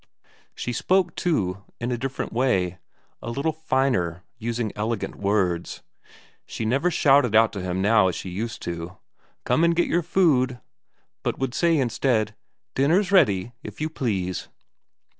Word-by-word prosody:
She 125 - -3
spoke, 180 +4 +2
too, 100 - -1 0.2
in 120 +1 -2
a - - +1
different 135 +3 -4
way, 95 -8 +1 0.4
a - - -5
little 140 +7 -1
finer, 130 - 0 0.2
using 115 -1 -2
elegant 110 0 -2
words. 95 -4 -1 0.6
She 110 - -4
never 135 +10 +2
shouted 140 - +4
out 115 0 +5
to 100 - -4
him 90 +1 -2
now 105 -2 +5
as 90 - -1
she 95 - -6
used 115 +5 -4
to: 85 +1 -5 0.5
"Come 160 - +2
and 170 0 +4
get 175 - +2
your 175 - +2
food!" 145 -8 +2 0.6
but - - -2
would 135 -2 -2
say 170 +1 +3
instead: 120 -4 +1 0.4
"Dinner's 175 +9 +2
ready, 120 - +3
if 160 - -9
you 155 +1 -2
please." 95 - -2
120 Hz, 150 wpm, -24 LUFS, 100-150 Hz, 0.6 s, out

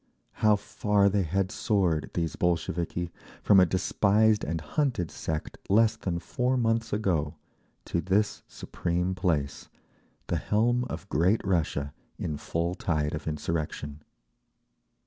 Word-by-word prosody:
How 105 -1 +6
far 105 0 +1
they 100 0 +1
had 95 +2 0
soared, 90 -8 0
these 85 -2 -1
Bolsheviki, 85 0 -1 0.3
from 100 -2 +6
a 90 - +6
despised 105 +4 +2
and 80 +2 -2
hunted 95 - -1
sect 80 -1 -4
less 110 +2 +4
than 90 -5 -3
four 125 +8 -1
months 115 -1 +1
ago, 85 -8 0 0.5
to 85 - -1
this 100 +3 +1
supreme 90 +1 -2
place, 80 -7 -1 0.6
the - - -1
helm 120 +4 +1
of - - -6
great 90 - +2
Russia 75 -6 0 0.2
in 75 - -3
full 85 +4 -2
tide 75 -5 -1
of 75 - -5
insurrection! 75 -1 -3
90 Hz, 125 wpm, -28 LUFS, 80-105 Hz, 0.6 s, How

